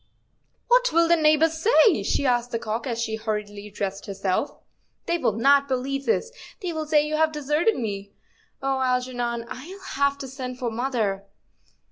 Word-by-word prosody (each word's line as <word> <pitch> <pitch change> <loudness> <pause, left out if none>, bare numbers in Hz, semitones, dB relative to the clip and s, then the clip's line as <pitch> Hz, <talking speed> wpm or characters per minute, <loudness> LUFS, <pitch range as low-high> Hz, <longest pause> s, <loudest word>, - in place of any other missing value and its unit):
"What - - +4
will 335 0 +4
the 340 - +5
neighbors 315 0 +3
say?" 440 -2 +5
she 280 - 0
asked 245 -1 +1
the 230 - -2
cock, 225 +2 -4
as 235 -2 -2
she 220 -1 -2
hurriedly 210 -2 -4
dressed 195 0 -4
herself; 195 +5 -1 0.3
" - - -46
they 340 0 0
will 220 - +1
not 280 +5 +4
believe 275 +1 -2
this; 465 +1 +1 0.3
they 360 -5 -4
will 315 -1 -4
say 300 -1 +3
you 305 0 -1
have 315 0 +3
deserted 300 +7 +1
me. 200 -4 -4 0.5
Oh, 270 0 0
Algernon, 250 -2 -1
I'll 325 +12 -9
have 280 0 +1
to 275 - -7
send 255 -1 -6
for 245 -2 -3
mother." 220 -5 -1
260 Hz, 175 wpm, -24 LUFS, 230-310 Hz, 0.5 s, the